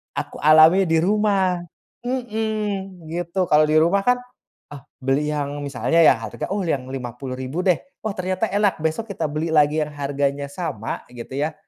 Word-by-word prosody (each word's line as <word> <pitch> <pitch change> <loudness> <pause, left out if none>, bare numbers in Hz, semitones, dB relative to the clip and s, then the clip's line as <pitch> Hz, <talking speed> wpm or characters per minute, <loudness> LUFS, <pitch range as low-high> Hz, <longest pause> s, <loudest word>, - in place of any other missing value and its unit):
aku - - -4
alami 155 +5 +6
di 165 0 +3
rumah. 200 -2 +2 0.5
Mmm, 215 -7 -3
gitu, 175 +2 -1
kalau 155 0 +6
di 155 - +1
rumah 180 +5 +3
kan, 250 0 +5 0.5
ah, 145 - -9 0.2
beli 135 +3 +1
yang 145 0 -3
misalnya 130 +2 -1
ya 160 - +7
harga, - - -5
"Oh, 205 - -1
yang 140 -6 -1
Rp50.000 130 +4 -5
deh," 180 -3 +4 0.3
"Oh 215 - 0
ternyata 185 +3 -1
enak," 200 -4 +1
besok 185 +8 -2
kita 170 -4 -3
beli 155 +3 -2
lagi 150 0 +4
yang 150 - -7
harganya 140 0 -2
sama, 140 - -5
gitu 120 +2 -8
ya, 150 +3 -1
160 Hz, 165 wpm, -22 LUFS, 140-190 Hz, 0.5 s, ya